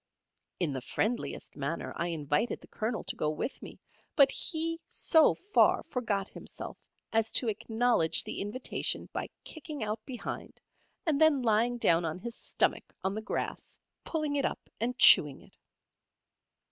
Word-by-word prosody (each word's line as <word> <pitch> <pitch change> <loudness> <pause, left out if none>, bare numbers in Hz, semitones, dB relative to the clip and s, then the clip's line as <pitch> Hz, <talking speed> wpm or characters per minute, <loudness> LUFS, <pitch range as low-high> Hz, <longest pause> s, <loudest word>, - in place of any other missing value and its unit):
In 165 -6 0
the 130 - -3
friendliest 220 - -2
manner 145 +3 -3
I 170 - -1
invited 155 - -1
the - - -16
Colonel 220 +1 -3
to - - -1
go 150 - 0
with 155 - -3
me; - - -10 0.4
but 275 -2 +6
he 330 -1 -1
so 320 -1 +4
far 410 +3 +3
forgot 205 -6 -2
himself - - -7 0.3
as 225 0 +2
to 245 - +3
acknowledge 220 -4 +1
the - - -4
invitation 210 +6 -2
by - - -3
kicking 305 -4 -6
out 215 +1 -3
behind, 250 -1 -7 0.5
and 315 -3 +1
then 305 -5 +5
lying 235 +2 +2
down 170 -7 +3
on 160 +1 -2
his 235 +5 -4
stomach - - -1
on 190 - 0
the 215 - -3
grass, - - -4 0.3
pulling 305 -3 -2
it 280 - +1
up - - -3
and 240 +3 -1
chewing 145 - +7
it. - - -20
225 Hz, 155 wpm, -30 LUFS, 185-275 Hz, 0.5 s, chewing